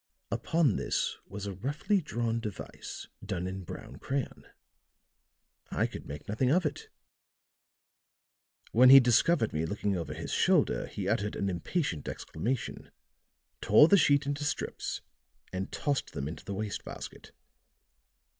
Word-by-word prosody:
Upon 160 Hz, -, +2 dB
this -, -, -1 dB
was 100 Hz, +1 st, -6 dB
a 100 Hz, -, -3 dB
roughly 145 Hz, -, 0 dB
drawn 115 Hz, -6 st, -1 dB
device 105 Hz, -4 st, -7 dB, 0.2 s
done 95 Hz, -3 st, -3 dB
in 95 Hz, +1 st, -4 dB
brown -, -, -8 dB
crayon. 135 Hz, -1 st, -4 dB, 1.2 s
I -, -, +1 dB
could -, -, -7 dB
make 75 Hz, +2 st, -8 dB
nothing 110 Hz, +5 st, +1 dB
of 175 Hz, +5 st, +3 dB
it. 150 Hz, +1 st, -3 dB, 1.8 s
When 125 Hz, +3 st, +7 dB
he 135 Hz, +1 st, +12 dB
discovered 125 Hz, +2 st, +3 dB
me 75 Hz, +1 st, 0 dB
looking 100 Hz, +3 st, -1 dB
over 80 Hz, -4 st, -4 dB
his 80 Hz, -, -5 dB
shoulder -, -, +3 dB
he -, -, -4 dB
uttered 105 Hz, +1 st, 0 dB
an 100 Hz, -, -1 dB
impatient 90 Hz, -, -2 dB
exclamation, 115 Hz, +9 st, -3 dB, 0.7 s
tore 130 Hz, +9 st, +7 dB
the 200 Hz, -, +6 dB
sheet 145 Hz, -5 st, +4 dB
into 145 Hz, +1 st, -2 dB
strips 145 Hz, -, -3 dB, 0.5 s
and 95 Hz, +1 st, -3 dB
tossed 145 Hz, -2 st, -1 dB
them 70 Hz, -2 st, -3 dB
into 80 Hz, 0 st, -7 dB
the 100 Hz, -, -4 dB
waste 105 Hz, +1 st, -3 dB
basket. -, -, -9 dB
110 Hz, 135 wpm, -30 LUFS, 95-145 Hz, 1.8 s, he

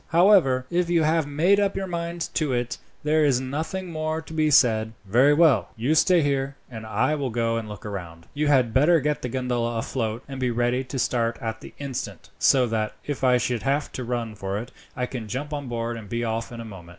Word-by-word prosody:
However, 165 Hz, -8 st, +4 dB
if 175 Hz, 0 st, +1 dB
you 170 Hz, -2 st, +3 dB
have 160 Hz, -1 st, +2 dB
made 170 Hz, +8 st, +3 dB
up 200 Hz, -1 st, +1 dB
your 195 Hz, 0 st, -2 dB
mind 170 Hz, -1 st, -4 dB
to 150 Hz, -5 st, 0 dB
it, 120 Hz, 0 st, -2 dB, 0.2 s
there 155 Hz, +1 st, +3 dB
is 135 Hz, -4 st, +3 dB
nothing 160 Hz, +8 st, -4 dB
more 155 Hz, 0 st, -2 dB
to 160 Hz, 0 st, -10 dB
be 155 Hz, -1 st, +2 dB
said." 110 Hz, -6 st, +4 dB
"Very 125 Hz, +9 st, +4 dB
well. 145 Hz, -, +4 dB
You 120 Hz, +7 st, +1 dB
stay 170 Hz, +1 st, +4 dB
here, 140 Hz, -1 st, -1 dB, 0.2 s
and 110 Hz, -2 st, -7 dB
I 130 Hz, +7 st, +1 dB
will 140 Hz, -4 st, -1 dB
go 115 Hz, 0 st, 0 dB
and 110 Hz, -2 st, -5 dB
look 105 Hz, 0 st, -9 dB
round. 85 Hz, -5 st, -7 dB
You 150 Hz, +1 st, 0 dB
had 130 Hz, -6 st, +3 dB
better 155 Hz, +6 st, +5 dB
get 150 Hz, +1 st, -1 dB
the 125 Hz, -, -3 dB
gondola 120 Hz, -2 st, -1 dB
afloat, 115 Hz, 0 st, -3 dB
and 135 Hz, -2 st, -7 dB
be 125 Hz, -1 st, +1 dB
ready 120 Hz, +2 st, 0 dB
to 130 Hz, +2 st, -5 dB
start 115 Hz, -2 st, 0 dB
at 110 Hz, -1 st, -4 dB
the -, -, -12 dB
instant, 140 Hz, -3 st, -6 dB
so 130 Hz, -2 st, +4 dB
that, 110 Hz, -2 st, -2 dB
if 145 Hz, -2 st, -4 dB
I 125 Hz, -1 st, +5 dB
should 120 Hz, -1 st, -1 dB
have 140 Hz, +2 st, 0 dB
to 130 Hz, -, -5 dB
run 120 Hz, -2 st, -3 dB
for 100 Hz, -1 st, -4 dB
it, 120 Hz, +4 st, -6 dB, 0.2 s
I 125 Hz, -, -1 dB
can 120 Hz, -3 st, -6 dB
jump 145 Hz, +8 st, -4 dB
on 145 Hz, -2 st, -4 dB
board 115 Hz, -1 st, -3 dB
and 105 Hz, -3 st, -10 dB
be 120 Hz, +1 st, -2 dB
off 115 Hz, 0 st, -2 dB
in 120 Hz, -, -8 dB
a 115 Hz, -, -6 dB
moment." 95 Hz, -6 st, -11 dB
130 Hz, 230 wpm, -25 LUFS, 115-150 Hz, 0.2 s, better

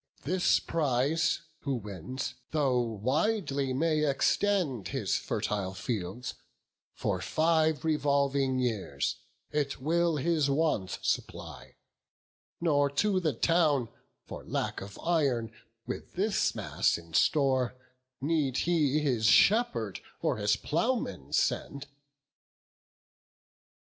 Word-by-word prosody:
This 180 Hz, +4 st, +2 dB
prize 150 Hz, 0 st, 0 dB, 0.2 s
who 140 Hz, -2 st, -2 dB
wins, 105 Hz, +4 st, -5 dB, 0.2 s
though 140 Hz, -5 st, +2 dB
widely 135 Hz, -, 0 dB
may 155 Hz, +3 st, +1 dB
extend 150 Hz, -, +1 dB
His 130 Hz, -8 st, -1 dB
fertile 95 Hz, -2 st, -2 dB
fields, 100 Hz, +3 st, -4 dB, 0.6 s
for -, -, -2 dB
five 160 Hz, -1 st, +2 dB
revolving 140 Hz, -3 st, +1 dB
years 105 Hz, -, -1 dB, 0.3 s
It 145 Hz, -2 st, -1 dB
will 165 Hz, +4 st, +1 dB
his 155 Hz, -1 st, +1 dB
wants 140 Hz, -, 0 dB
supply; -, -, -4 dB, 0.8 s
nor 145 Hz, -4 st, +2 dB
to 190 Hz, +7 st, +1 dB
the 160 Hz, -5 st, 0 dB
town 150 Hz, -3 st, +2 dB, 0.4 s
For -, -, -8 dB
lack -, -, -3 dB
of 100 Hz, +1 st, -9 dB
iron, 135 Hz, -10 st, +1 dB, 0.3 s
with 125 Hz, -, -6 dB
this 195 Hz, +2 st, +1 dB
mass -, -, +1 dB
in 85 Hz, -1 st, -14 dB
store, 130 Hz, -, +2 dB, 0.4 s
Need 145 Hz, -3 st, 0 dB
he 155 Hz, -4 st, +2 dB
his 120 Hz, -7 st, +1 dB
shepherd 120 Hz, -, +4 dB, 0.2 s
or -, -, 0 dB
his 105 Hz, 0 st, +2 dB
ploughman 165 Hz, -, -2 dB
send." 140 Hz, 0 st, 0 dB
140 Hz, 105 wpm, -30 LUFS, 120-160 Hz, 0.8 s, shepherd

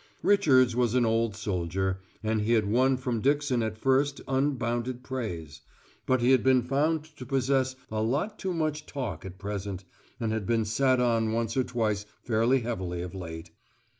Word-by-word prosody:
Richards 130 Hz, -, +4 dB
was 120 Hz, -1 st, +1 dB
an 125 Hz, -2 st, +4 dB
old 115 Hz, -1 st, +1 dB
soldier, 95 Hz, -1 st, -2 dB, 0.2 s
and 110 Hz, 0 st, +1 dB
he 110 Hz, +3 st, +1 dB
had 110 Hz, -3 st, +3 dB
won 130 Hz, +5 st, +3 dB
from 125 Hz, -3 st, -2 dB
Dixon 140 Hz, -2 st, +2 dB
at 110 Hz, -1 st, -2 dB
first 135 Hz, +4 st, +2 dB
unbounded 125 Hz, -2 st, -1 dB
praise; 105 Hz, -, -5 dB, 0.5 s
but 130 Hz, -1 st, +2 dB
he 125 Hz, +2 st, +4 dB
had 130 Hz, -3 st, +4 dB
been 130 Hz, -2 st, +4 dB
found 150 Hz, +5 st, +1 dB
to -, -, -7 dB
possess 130 Hz, 0 st, +1 dB, 0.2 s
a 110 Hz, 0 st, -1 dB
lot 140 Hz, -, -1 dB
too 190 Hz, -, -2 dB
much 155 Hz, -2 st, -2 dB
talk 115 Hz, -, -5 dB
at 95 Hz, 0 st, -8 dB
present, 100 Hz, -1 st, -5 dB, 0.4 s
and 110 Hz, -1 st, -1 dB
had 110 Hz, -3 st, -3 dB
been 115 Hz, -2 st, +2 dB
sat 130 Hz, +4 st, +2 dB
on 115 Hz, -2 st, +2 dB
once 115 Hz, 0 st, -1 dB
or 130 Hz, -, +3 dB
twice 105 Hz, -4 st, -1 dB, 0.2 s
fairly 120 Hz, +3 st, +2 dB
heavily 95 Hz, -7 st, -3 dB
of 90 Hz, -, -7 dB
late. 80 Hz, -3 st, -7 dB
120 Hz, 175 wpm, -28 LUFS, 105-130 Hz, 0.5 s, Richards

